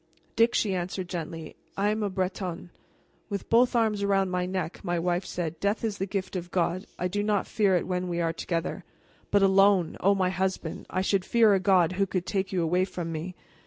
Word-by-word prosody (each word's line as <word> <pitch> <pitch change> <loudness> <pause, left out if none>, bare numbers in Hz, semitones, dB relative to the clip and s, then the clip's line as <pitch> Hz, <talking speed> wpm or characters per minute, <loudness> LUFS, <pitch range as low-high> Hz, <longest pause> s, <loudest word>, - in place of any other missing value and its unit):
"Dick," 230 +1 +4
she 200 -3 +1
answered 185 0 -3
gently, 165 -2 -6 0.2
"I 200 +1 +2
am 215 +1 -1
a 205 - 0
Bretonne." 185 -2 -3 0.6
With 200 -2 -5
both 245 +2 +4
arms 220 -3 +2
around 195 -2 +1
my 180 0 -1
neck, 185 -3 -4
my 175 0 -1
wife 175 +2 -1
said, 165 -2 -4
"Death 200 +3 0
is 215 -3 -2
the 195 - -1
gift 190 -1 -3
of 175 -1 -4
God. 180 +2 -1
I 180 - -1
do 205 +3 -2
not 210 -1 +1
fear 200 -4 +2
it 175 - 0
when 180 0 -2
we 175 -1 -2
are 165 -1 0
together. 170 +2 -3 0.5
But 205 -1 +3
alone 195 -2 +4
oh, 200 +2 +3
my 185 -1 +1
husband, 185 -3 -3
I 185 - -1
should 190 0 +1
fear 225 0 +4
a 195 - +3
God 185 -3 +4
who 195 +1 0
could 180 -1 -2
take 195 -1 -2
you 180 -3 0
away 180 +3 +2
from 175 -3 -4
me!" 165 +3 -5
185 Hz, 215 wpm, -27 LUFS, 175-200 Hz, 0.6 s, Dick